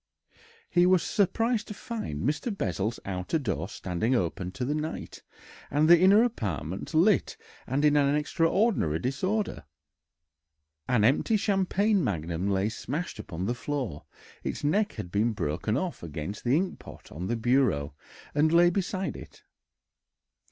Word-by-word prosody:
He 175 Hz, 0 st, +3 dB
was 185 Hz, -2 st, +4 dB
surprised 225 Hz, +3 st, +1 dB
to 210 Hz, -, -7 dB
find 145 Hz, -, -5 dB
Mr. 150 Hz, -, -1 dB
Bessel's 95 Hz, -, -2 dB
outer 95 Hz, -, -2 dB
door 105 Hz, -8 st, -3 dB
standing 95 Hz, +8 st, -1 dB
open 90 Hz, -3 st, -1 dB
to 125 Hz, -, -3 dB
the 145 Hz, -, 0 dB
night, 155 Hz, +1 st, -5 dB, 0.5 s
and 150 Hz, +3 st, +2 dB
the 170 Hz, 0 st, +8 dB
inner 195 Hz, +5 st, +6 dB
apartments 100 Hz, -, -3 dB
lit 185 Hz, +6 st, +3 dB, 0.3 s
and 140 Hz, +4 st, +1 dB
in 150 Hz, 0 st, +4 dB
an 145 Hz, 0 st, +3 dB
extraordinary 165 Hz, -, +1 dB
disorder. 185 Hz, -, -2 dB, 1.2 s
An 125 Hz, -4 st, +2 dB
empty 145 Hz, -, +3 dB
champagne 200 Hz, 0 st, +1 dB
magnum 85 Hz, -, -2 dB
lay 95 Hz, +1 st, +1 dB
smashed 140 Hz, +9 st, -5 dB
upon 90 Hz, +2 st, -5 dB
the 120 Hz, -, 0 dB
floor; 120 Hz, -, -4 dB, 0.4 s
its -, -, -4 dB
neck 205 Hz, +8 st, +1 dB
had 90 Hz, -, -7 dB
been 110 Hz, +4 st, +1 dB
broken 90 Hz, +5 st, -1 dB
off 175 Hz, +4 st, -3 dB
against 80 Hz, +5 st, -6 dB
the 125 Hz, +3 st, +3 dB
inkpot 185 Hz, +2 st, -5 dB
on 90 Hz, +5 st, -5 dB
the 120 Hz, -, 0 dB
bureau 115 Hz, -, +1 dB, 0.4 s
and 155 Hz, +2 st, +3 dB
lay 175 Hz, +1 st, +6 dB
beside 190 Hz, +1 st, -2 dB
it. -, -, -12 dB
135 Hz, 145 wpm, -28 LUFS, -, 1.2 s, the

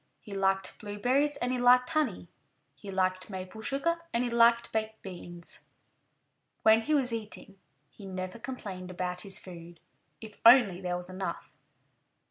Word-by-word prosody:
He 210 Hz, -, -10 dB
liked 195 Hz, 0 st, 0 dB
blueberries 250 Hz, +8 st, 0 dB
and 250 Hz, -2 st, -1 dB
he 255 Hz, -, -1 dB
liked 250 Hz, +1 st, +5 dB
honey; 255 Hz, -, 0 dB, 0.5 s
he 205 Hz, -, -11 dB
liked 185 Hz, 0 st, 0 dB
maple 190 Hz, +2 st, -7 dB
sugar 310 Hz, +8 st, -1 dB
and 235 Hz, +1 st, +1 dB
he 245 Hz, -, -2 dB
liked 235 Hz, 0 st, +4 dB
baked 220 Hz, 0 st, -2 dB
beans. 175 Hz, -2 st, -8 dB, 1.0 s
When 220 Hz, +1 st, +6 dB
he 305 Hz, +7 st, +1 dB
was 255 Hz, -4 st, +1 dB
eating 210 Hz, -3 st, -6 dB, 0.3 s
he 200 Hz, -, -11 dB
never 185 Hz, +2 st, -5 dB
complained 200 Hz, -7 st, -6 dB
about 180 Hz, 0 st, -3 dB
his 195 Hz, -2 st, -1 dB
food 170 Hz, -2 st, -11 dB, 0.4 s
if 220 Hz, -2 st, -12 dB
only 230 Hz, -6 st, +7 dB
there 180 Hz, -1 st, -2 dB
was 180 Hz, 0 st, -8 dB
enough. 185 Hz, +1 st, -5 dB
205 Hz, 150 wpm, -30 LUFS, 185-245 Hz, 1.0 s, only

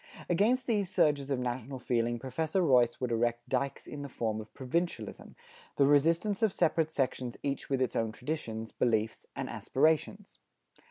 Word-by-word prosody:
Against 225 Hz, +9 st, +2 dB
these 210 Hz, -6 st, 0 dB
surges 145 Hz, -5 st, +2 dB
of 135 Hz, -, +1 dB
national 125 Hz, +1 st, -3 dB
feeling 120 Hz, -1 st, 0 dB
Professor 155 Hz, +9 st, -1 dB
Royce 125 Hz, -6 st, +4 dB
would 125 Hz, -2 st, -2 dB
erect 120 Hz, +1 st, 0 dB
dikes 140 Hz, 0 st, -1 dB
in 145 Hz, -, -7 dB
the 140 Hz, -, -6 dB
form 110 Hz, -3 st, -2 dB
of 110 Hz, -, -13 dB
provincialism, 165 Hz, +7 st, -3 dB, 0.4 s
the 140 Hz, -, +4 dB
resistance 165 Hz, +8 st, +3 dB
of 220 Hz, -3 st, +3 dB
separate 165 Hz, -3 st, +2 dB
sections 130 Hz, -4 st, -2 dB
each 140 Hz, -1 st, -3 dB
with 135 Hz, -2 st, +2 dB
its 125 Hz, -, -3 dB
own 115 Hz, -1 st, 0 dB
traditions, 115 Hz, -4 st, -4 dB
beliefs 110 Hz, -2 st, 0 dB
and -, -, -3 dB
aspirations. 160 Hz, +8 st, 0 dB
135 Hz, 160 wpm, -31 LUFS, 120-160 Hz, 0.4 s, Royce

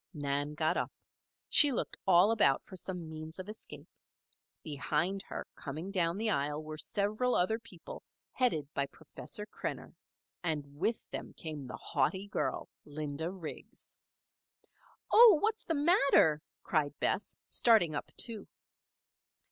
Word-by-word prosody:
Nan 145 Hz, 0 st, -1 dB
got 155 Hz, 0 st, +1 dB
up. -, -, -1 dB, 0.6 s
She 295 Hz, -2 st, +7 dB
looked 250 Hz, -, -2 dB
all 185 Hz, +3 st, +6 dB
about 170 Hz, -12 st, +3 dB
for 190 Hz, -, -11 dB
some 180 Hz, -2 st, -5 dB
means 155 Hz, 0 st, -8 dB
of 185 Hz, 0 st, -7 dB
escape. 215 Hz, +1 st, -9 dB, 0.8 s
Behind 155 Hz, +6 st, -1 dB
her, -, -, -5 dB
coming 155 Hz, +7 st, -6 dB
down 175 Hz, -2 st, +1 dB
the 220 Hz, 0 st, +1 dB
aisle, 150 Hz, -1 st, -1 dB
were 155 Hz, 0 st, -7 dB
several 215 Hz, +7 st, 0 dB
other 220 Hz, +6 st, +2 dB
people -, -, -10 dB, 0.3 s
headed 195 Hz, -, +1 dB
by 140 Hz, 0 st, 0 dB
Professor 160 Hz, +8 st, -6 dB
Krenner. 210 Hz, -, -6 dB, 0.5 s
And 155 Hz, -4 st, 0 dB
with 220 Hz, +6 st, -1 dB
them -, -, -5 dB
came 150 Hz, -5 st, -6 dB
the 125 Hz, -, -7 dB
haughty 190 Hz, +8 st, -1 dB
girl, -, -, -2 dB, 0.2 s
Linda 150 Hz, +2 st, -4 dB
Riggs. 180 Hz, -4 st, -8 dB, 1.2 s
"Oh! 450 Hz, -6 st, +9 dB
what's 435 Hz, +3 st, 0 dB
the 330 Hz, -, 0 dB
matter?" 280 Hz, -, +4 dB, 0.2 s
cried 145 Hz, -3 st, 0 dB
Bess, 210 Hz, -, -1 dB
starting 215 Hz, -9 st, +4 dB
up, 145 Hz, -, -3 dB
too. 225 Hz, -4 st, -1 dB
175 Hz, 135 wpm, -32 LUFS, 150-215 Hz, 1.2 s, Oh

